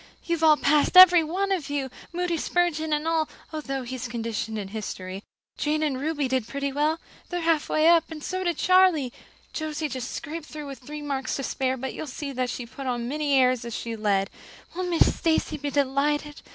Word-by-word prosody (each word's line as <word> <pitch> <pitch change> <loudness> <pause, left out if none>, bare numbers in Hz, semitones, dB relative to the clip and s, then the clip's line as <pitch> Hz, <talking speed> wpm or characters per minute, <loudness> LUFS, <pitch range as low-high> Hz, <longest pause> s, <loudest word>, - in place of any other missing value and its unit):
You've 335 -1 -1
all 310 -1 +7
passed, 295 +5 +3
every 360 -2 +10
one 380 +5 -1
of 345 -8 -1
you, 275 -3 -2 0.2
Moody 350 0 -1
Spurgeon 320 -1 0
and 300 +1 0
all, 325 -1 +1 0.2
although 275 -4 -3
he's 250 0 -5
conditioned 225 -2 -3
in 200 -2 -5
history. 195 -3 -6 0.4
Jane 305 +1 0
and 270 -4 -1
Ruby 295 -2 -1
did 255 -3 -1
pretty 280 0 -3
well 300 +4 +1 0.3
they're 355 -1 -2
halfway 320 -1 +2
up 335 -1 +6
and 310 -2 -8
so 370 0 -2
did 345 -3 0
Charlie. 365 -8 +4 0.4
Josie 310 0 -3
just 255 -2 -4
scraped 310 +1 -6
through 300 -1 -7
with 275 -1 -8
three 295 +3 -8
marks 270 -2 -2
to 275 - -3
spare, 260 0 -1
but 265 +1 -4
you'll 315 - -6
see 280 +1 -5
she'll 245 0 -5
put 270 +3 -8
on 240 -2 -1
as 235 - -4
many 290 0 0
airs 255 -1 +4
as 235 -1 -6
if - - -3
she'd 230 -1 -5
led. 200 -2 +1 0.4
Won't 365 0 -2
Miss 335 -2 +3
Stacy 320 -2 +1
be 290 0 -3
delighted? 290 +2 0
295 Hz, 205 wpm, -26 LUFS, 260-320 Hz, 0.4 s, every